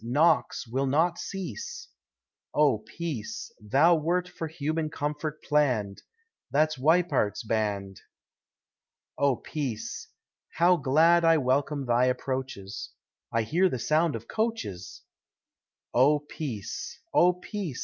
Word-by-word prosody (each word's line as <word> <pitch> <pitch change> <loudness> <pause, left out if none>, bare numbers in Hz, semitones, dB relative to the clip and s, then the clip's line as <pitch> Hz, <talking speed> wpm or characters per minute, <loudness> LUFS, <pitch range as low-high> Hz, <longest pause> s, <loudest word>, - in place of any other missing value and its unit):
Knocks 145 +8 +2
will 135 +4 -1
not 165 +5 +2
cease. 190 - -6 0.7
Oh 140 -8 +4
Peace! 120 +1 -6
thou 135 +11 +4
wert 170 +3 +1
for 165 - -6
human 155 0 -2
comfort 150 +1 -4
plann'd 125 -10 +1 0.5
That's 155 +2 +2
Weippert's 160 -8 +2
band. 105 -4 -2 1.1
Oh 140 -2 +2
Peace! 130 -5 -5 0.5
how 175 +2 +4
glad 165 +5 +4
I 165 0 +5
welcome 140 +1 0
thy 120 +1 +3
approaches 130 -6 -3 0.4
I 115 0 +1
hear 175 - +2
the 130 - -2
sound 155 +5 +1
of 115 0 -7
coaches. 215 - -3 0.9
Oh 140 +5 +5
Peace! 140 - -6
oh 180 +1 +5
Peace! 180 - -5
145 Hz, 110 wpm, -27 LUFS, 120-165 Hz, 1.1 s, I